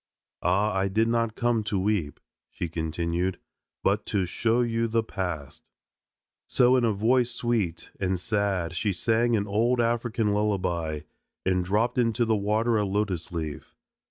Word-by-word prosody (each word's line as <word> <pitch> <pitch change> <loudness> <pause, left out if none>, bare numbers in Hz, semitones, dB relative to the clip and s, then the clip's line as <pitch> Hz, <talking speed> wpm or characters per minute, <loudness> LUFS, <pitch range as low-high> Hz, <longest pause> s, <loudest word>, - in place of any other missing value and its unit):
"Ah! 100 +4 +2
I 95 0 +1
did 110 +4 +2
not 115 -1 0
come 120 -2 +1
to 105 - -1
weep," 95 -7 -1 0.3
she 85 - -4
continued, 85 +3 -2 0.5
"but 100 +2 +2
to 100 -3 +1
show 115 +6 +1
you 115 -1 0
the 115 0 +1
past." 90 -9 -5 0.8
So 125 +1 +4
in 125 - +3
a 115 - +3
voice 120 +4 +2
sweet 115 -8 -2
and 95 -1 0
sad 95 -4 -1
she 100 +2 0
sang 115 +5 +2
an 100 -2 0
old 115 +5 +1
African 115 -2 +1
lullaby 90 -7 -1 0.4
and 90 -1 +2
dropped 105 +7 +1
into 120 0 +2
the 110 -1 +2
water 110 +3 +1
a - - +1
lotus 95 -4 -1
leaf. 80 -3 -5
105 Hz, 155 wpm, -27 LUFS, 90-115 Hz, 0.8 s, So